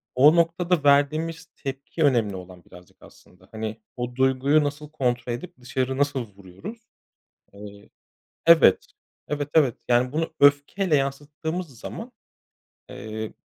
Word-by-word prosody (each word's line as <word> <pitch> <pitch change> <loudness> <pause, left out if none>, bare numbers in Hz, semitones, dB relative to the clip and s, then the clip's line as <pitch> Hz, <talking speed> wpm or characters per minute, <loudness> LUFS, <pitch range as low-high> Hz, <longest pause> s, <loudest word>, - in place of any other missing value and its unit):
O 145 +5 +6
noktada 170 0 +1
verdiğimiz 155 +4 +2
tepki 135 +4 -4
önemli 115 -8 +2
olan 90 -1 -12
birazcık 90 0 -17
aslında. 90 +1 -19
Hani, 110 0 -5 0.2
o 125 0 -4
duyguyu 130 +3 +3
nasıl 145 +1 -4
kontrol 125 -5 -1
edip 120 - -7
dışarı 130 +1 -2
nasıl 140 -4 0
vuruyoruz? 100 - -10 0.7
Eee, 100 0 -12 0.6
evet. 165 - +6 0.4
Evet, 145 -1 -3
evet, 140 -7 +3
yani, 125 +1 +2
bunu 160 +1 -2
öfkeyle 145 +5 +3
yansıttığımız 145 +2 -3
zaman, 235 - -8 0.8
eee, 110 +1 -6
135 Hz, 120 wpm, -24 LUFS, 115-155 Hz, 0.8 s, O